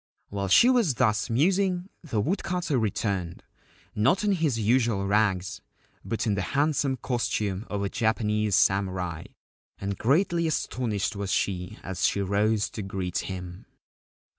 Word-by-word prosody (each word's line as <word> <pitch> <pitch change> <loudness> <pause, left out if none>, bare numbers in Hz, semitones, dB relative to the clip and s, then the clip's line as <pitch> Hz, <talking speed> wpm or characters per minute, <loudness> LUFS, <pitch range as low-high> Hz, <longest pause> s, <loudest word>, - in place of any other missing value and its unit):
While 100 -1 -3
she 165 - +6
was 235 - +3
thus 110 -3 +1
musing, 180 - +1 0.2
the 120 -10 -2
woodcutter 175 - -1
returned, 100 -5 -2 0.5
not 135 - +2
in 210 - +2
his 160 -10 +1
usual 115 -2 +2
rags, 100 -2 +1 0.4
but 115 +1 -2
in 105 - +1
the 100 - -1 0.2
handsome 145 -2 +1
costume 110 -5 -2
of 100 -1 -2
a 100 - -1
Japanese 105 -2 0
samurai, 95 -4 +1 0.5
and 100 0 -4
greatly 170 - +2
astonished 115 -10 -1
was 100 -1 -3
she 90 -2 -1
as 95 -2 -4
she - - -1
rose 100 +2 +1
to 110 - -5
greet 95 -2 -3
him. 90 -2 -7
105 Hz, 140 wpm, -27 LUFS, 100-135 Hz, 0.5 s, she